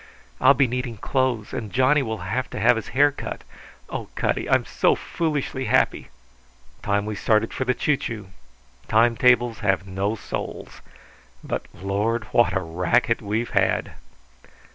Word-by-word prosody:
"I'll 140 - +6
be 135 - +4
needing 125 -2 -3
clothes, 125 -2 -1
and 105 -3 -4
Johnny 130 +5 +3
will 110 -5 -4
have 125 +6 -2
to - - -6
have 120 +4 +5
his 115 - -5
hair 145 +1 +6
cut. 140 - -7 0.4
Oh, - - -5
Cutty, - - -1
I'm - - +3
so - - +2
foolishly 145 -5 -2
happy!" - - +1 0.7
"Time 100 0 0
we 110 - -3
started 110 +2 +1
for 130 - -2
the 125 0 +1
choo 150 -2 +1
choo. 105 -7 -6 0.6
Time 115 +2 +4
tables 120 -2 +3
have 95 -3 0
no 95 +3 -2
souls. - - -7 0.6
But, - - -4
Lord, 105 +5 -1
what 120 -6 +3
a 95 - 0
racket 90 +8 +1
we've 110 +3 -2
had!" - - +1
115 Hz, 155 wpm, -23 LUFS, 100-125 Hz, 0.7 s, I'll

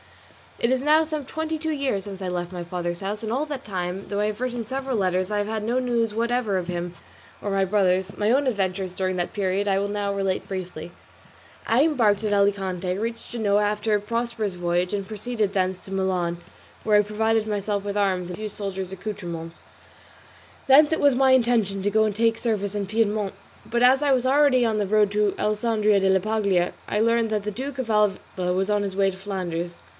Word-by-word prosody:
It 235 - +1
is 260 0 +1
now 305 +2 +5
some 305 -3 -4
twenty 315 +3 -3
two 320 +1 -2
years 275 -10 -1
since 195 -1 -7
I 190 - -3
left 175 0 -3
my 175 -1 -5
father's 175 0 -4
house, 205 +3 -3
and 220 - -3
all 270 +5 0
that 280 -3 -5
time, 185 -1 -4
though 205 - -2
I 210 - +2
have 215 +2 -4
written 245 -2 -2
several 265 +2 -3
letters, 185 -1 0
I 210 - +1
have 205 - -1
had 220 -1 -3
no 240 +4 +1
news 235 -3 0
whatever 230 -2 0
of 180 -2 -3
him 175 -1 -3 0.5
or 205 - -3
of - - -1
my 195 0 +3
brothers; 190 -1 +1
my 210 +1 0
own 275 +3 +3
adventures 190 -5 -1
during 185 0 -1
that 175 -1 -2
period 200 0 0
I 195 -1 +2
will 200 - -1
now 205 -1 -2
relate 195 -1 -1
briefly. 180 -3 -6 0.8
I 240 +5 +4
embarked 230 -10 +2
at 210 -1 0
Alicante, 190 -2 0
reached 230 +2 -4
Genoa 210 -3 +2
after 210 +1 +1
a - - +2
prosperous 230 -1 -2
voyage, 175 +1 -1
and 200 -2 -2
proceeded 215 -1 -2
thence 185 -1 -1
to 195 - -9
Milan, 185 -3 0 0.5
where 210 -1 +4
I - - +6
provided 220 +1 0
myself 205 -1 -1
with 205 0 -3
arms 185 -3 0
and 180 - -6
a - - -11
few 215 0 -4
soldier's 195 -2 -5
accoutrements; 175 -4 -6 1.1
thence 295 +3 +7
it 320 - 0
was 285 -3 +4
my 265 0 +4
intention 230 -6 +2
to 205 +2 0
go 220 +1 +4
and 210 -2 -1
take 225 +1 +2
service 210 -4 -2
in 205 -1 -1
Piedmont, 210 -1 0 0.3
but 235 +1 -1
as 260 +2 +6
I 285 - +3
was 255 -1 +2
already 275 -2 +4
on 225 -2 +1
the 205 - 0
road 210 0 +3
to 210 -1 +2
Alessandria 215 -1 +2
della 190 0 +3
Paglia, 200 -4 +1
I 210 - 0
learned 230 0 +2
that 210 -2 0
the 210 - -3
great - - -14
Duke 280 -1 -6
of 250 -3 -3
Alva 195 -4 0
was 190 +2 0
on 205 -1 +2
his 195 -2 -4
way 195 0 +3
to 190 - -7
Flanders. 175 -3 -4
205 Hz, 220 wpm, -24 LUFS, 190-230 Hz, 1.1 s, thence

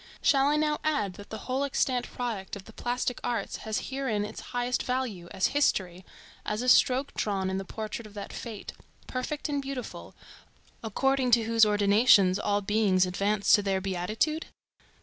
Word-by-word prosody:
Shall 275 -1 +4
I 295 - +3
now 300 0 +1
add 215 -12 0
that 205 +3 -12
the 220 - -5
whole 260 +2 -1
extant 255 -3 0
product 220 -7 -4
of 200 - -9
the 220 - -13
plastic 245 +1 -2
arts 230 -5 -2
has 220 -1 -4
herein 255 -6 -1
its - - -8
highest 245 0 -1
value, 250 -9 -3
as 190 - 0
history; 190 -11 +1 0.4
as 210 +3 -2
a 250 - +2
stroke 260 +2 +4
drawn 195 -2 -1
in 190 - -1
the 195 - -6
portrait 215 +2 -6
of 210 - -17
that 200 - -7
fate, 225 -4 -7 0.3
perfect 275 +5 -3
and 285 -1 -1
beautiful, 270 -3 -7 0.7
according 265 +4 +1
to 235 -1 +5
whose 225 0 +4
ordinations 205 -2 +5
all 205 0 0
beings 200 -2 +2
advance 200 +3 +1
to 210 - +6
their 195 -1 0
beatitude? 195 - -1
220 Hz, 170 wpm, -28 LUFS, 200-255 Hz, 0.7 s, to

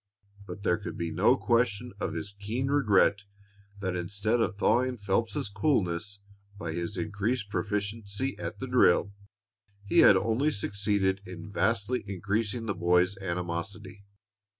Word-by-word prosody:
But 100 - -8
there 90 -4 +2
could - - -6
be 85 -1 -3
no 105 +10 +4
question 120 -1 +1
of - - -3
his 85 +5 -5
keen 115 +7 -2
regret 105 -7 +3 0.6
that 95 -2 -2
instead 100 +6 0
of 100 - 0
thawing 125 +5 +2
Phelps's 100 +1 -1
coolness 100 - -1 0.4
by 85 -5 -4
his 85 +4 -4
increased 105 +1 -2
proficiency 105 +5 -2
at - - -5
the 130 - -5
drill, 105 -6 +3 0.7
he 100 - +3
had 100 - +8
only 115 +9 +1
succeeded 100 -5 0
in 90 +1 -8
vastly 115 +3 0
increasing 105 +4 -2
the 105 - -1
boy's 90 +2 +2
animosity. 95 +3 -4
100 Hz, 135 wpm, -29 LUFS, 95-115 Hz, 0.7 s, had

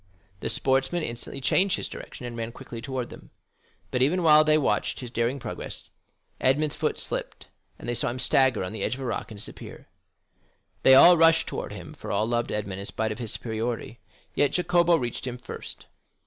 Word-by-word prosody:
The - - -3
sportsman 135 +6 +1
instantly 120 +1 -5
changed 185 +8 +3
his - - -3
direction, 125 - -9
and 120 -1 -6
ran 115 0 -4
quickly 120 -3 -8
towards 130 -1 -4
them. - - -12 0.6
But 125 - 0
even 170 +7 +2
while 155 -1 +7
they 155 0 +4
watched 150 - 0
his 125 -3 -7
daring 120 +3 0
progress, 135 - -7 0.5
Edmond's 145 +3 +2
foot 150 0 -1
slipped, - - -4 0.3
and - - -10
they 120 - 0
saw 120 - +1
him 120 - -4
stagger 130 -3 +3
on 90 - -5
the 110 - -5
edge - - 0
of 135 - -9
a - - -4
rock 120 - -3
and 105 -3 -10
disappear. 110 - -9 0.9
They 130 - +7
all 175 +6 +9
rushed 165 0 +5
towards - - -5
him, - - -9
for - - -7
all 110 - +1
loved 120 0 -1
Edmond 100 -3 -3
in 100 - -5
spite 110 0 -2
of 110 - -5
his 115 -3 -2
superiority; 115 0 -3 0.3
yet 145 - +2
Jacopo 175 -1 +3
reached 120 -2 -4
him 125 0 -4
first. 125 - -8
130 Hz, 200 wpm, -26 LUFS, 115-155 Hz, 0.9 s, all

